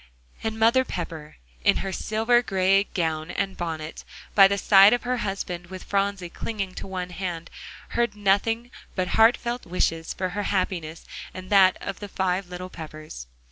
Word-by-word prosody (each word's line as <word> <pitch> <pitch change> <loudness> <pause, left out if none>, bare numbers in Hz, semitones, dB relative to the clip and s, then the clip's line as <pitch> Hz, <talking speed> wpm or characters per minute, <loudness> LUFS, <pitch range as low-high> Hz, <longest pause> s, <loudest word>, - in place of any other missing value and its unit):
And 220 0 -2
Mother 230 +4 +4
Pepper 160 -8 -6 0.3
in - - +4
her 190 - -3
silver 225 +4 +2
gray 195 -2 +2
gown 160 -3 -2
and 195 +1 -2
bonnet, 160 -2 -5 0.3
by 195 -1 +8
the 200 +1 0
side 200 +2 +7
of 245 - 0
her 250 +1 0
husband, 185 -5 -4
with 185 0 -8
Phronsie 200 -2 -1
clinging 200 -4 -4
to - - -7
one 180 -1 -4
hand, 175 -2 -5 0.4
heard 235 -3 0
nothing 215 +4 +1 0.2
but 185 -1 -1
heart 225 +2 +5
felt 240 0 -4
wishes 165 -2 0
for 185 -1 -2
her 200 +3 -3
happiness 175 -5 -2 0.3
and 185 +1 -8
that 190 -2 +6
of - - -5
the 205 - -7
five 185 0 -1
little 180 +1 -7
Peppers. 155 - -9
190 Hz, 170 wpm, -25 LUFS, 175-210 Hz, 0.4 s, by